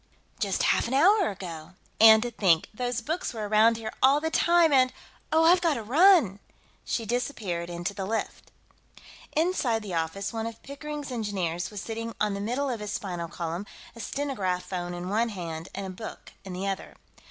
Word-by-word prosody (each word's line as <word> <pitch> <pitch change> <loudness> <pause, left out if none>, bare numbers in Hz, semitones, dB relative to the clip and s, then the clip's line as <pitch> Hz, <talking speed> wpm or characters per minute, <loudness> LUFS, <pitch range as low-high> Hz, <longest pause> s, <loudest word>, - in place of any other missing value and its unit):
"Just 200 -3 0
half - - +2
an 255 - -1
hour 385 +7 +5
ago. 175 -4 -8 0.3
And 220 0 +8
to 240 - -3
think, 180 -7 +2
those 245 +1 -2
books 315 0 -3
were 215 -2 -3
around 220 +2 +4
here 220 -1 -6
all 275 +3 +6
the 320 +1 -2
time, 340 -1 +4
and.... 255 -1 +5 0.4
Oh, 320 +1 +4
I've 350 +2 +6
got 330 -4 +2
to 230 - -4
run!" 285 - +5 0.4
She 230 - -2
disappeared 210 -8 -2
into 175 +3 -3
the 195 -2 -4
lift. 225 +1 -4 0.8
Inside 295 -10 +1
the 195 -4 -6
office, 170 +5 -2
one 225 0 -2
of 230 -1 -9
Pickering's 290 0 -6
engineers 190 -7 -2
was 210 -2 -6
sitting 230 0 -5
on 210 -1 +1
the 200 - -4
middle 250 +7 -1
of 235 - -3
his 210 -1 -5
spinal 175 -4 -4
column, 170 +3 -5 0.3
a - - -11
stenograph 205 -9 -2
phone 175 -1 -4
in 175 +1 -5
one 225 +4 +1
hand 170 -4 -6
and 195 - -4
a 190 - -5
book 220 +4 -9
in 190 -1 -7
the 185 +2 -4
other. 195 -1 -4
220 Hz, 190 wpm, -27 LUFS, 185-260 Hz, 0.8 s, And